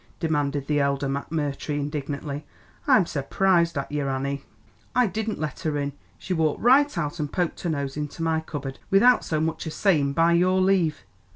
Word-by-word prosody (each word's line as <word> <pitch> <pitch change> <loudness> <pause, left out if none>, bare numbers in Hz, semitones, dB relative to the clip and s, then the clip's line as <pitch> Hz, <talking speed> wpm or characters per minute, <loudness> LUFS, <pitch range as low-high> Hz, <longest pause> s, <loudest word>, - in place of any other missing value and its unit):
demanded 145 -4 0
the 145 0 +1
elder 140 0 +1
McMurtry 145 +1 -3
indignantly. 145 0 -4 0.4
"I'm 255 -10 +5
surprised 170 +3 +1
at 140 - -3
ye, 150 0 -1
Annie." 140 0 -2 0.5
"I 250 - +5
didn't 215 +2 -2
let 155 -1 -4
her 155 -4 -1
in, 140 -1 -2 0.2
she 185 - -4
walked 160 -3 +1
right 275 +3 +4
out 160 0 -2
and 150 -1 -2
poked 175 -3 -1
her 175 - -2
nose 140 -3 -2
into 150 +2 -4
me 160 -1 +1
cupboard 140 -4 -6
without 240 +6 +5
so 155 - -1
much 160 +1 -2
as 155 - -5
sayin' 150 -9 +2
by 165 +3 +3
your 185 +2 +3
leave. 185 -5 +2
155 Hz, 180 wpm, -25 LUFS, 140-175 Hz, 0.5 s, I'm